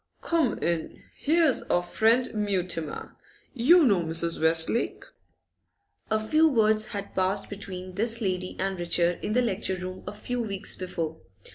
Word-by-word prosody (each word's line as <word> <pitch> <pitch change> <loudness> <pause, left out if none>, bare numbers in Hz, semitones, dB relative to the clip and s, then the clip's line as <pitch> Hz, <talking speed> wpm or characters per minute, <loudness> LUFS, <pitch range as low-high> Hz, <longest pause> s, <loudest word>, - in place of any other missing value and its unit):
'Come 320 -9 +1
in! 170 -2 -2
Here's 315 -2 +2
our 175 - +2
friend 225 +7 +2
Mutimer. 185 -7 -2 0.4
You 300 +7 +5
know 200 -8 +3
Mrs. 165 0 +1
Westlake?' 165 +8 +2 1.0
A 220 0 +1
few 310 +9 +3
words 215 -4 +2
had 200 -3 -6
passed 190 +2 0
between 185 -2 -7
this 225 +4 -1
lady 185 -4 -2
and 195 -1 -2
Richard 175 0 0
in 210 - -2
the 250 +2 +3
lecture 195 -4 -1
room 185 0 -7
a - - -3
few 245 +4 -4
weeks 200 -3 -3
before. 165 -4 -5
200 Hz, 145 wpm, -26 LUFS, 180-230 Hz, 1.0 s, You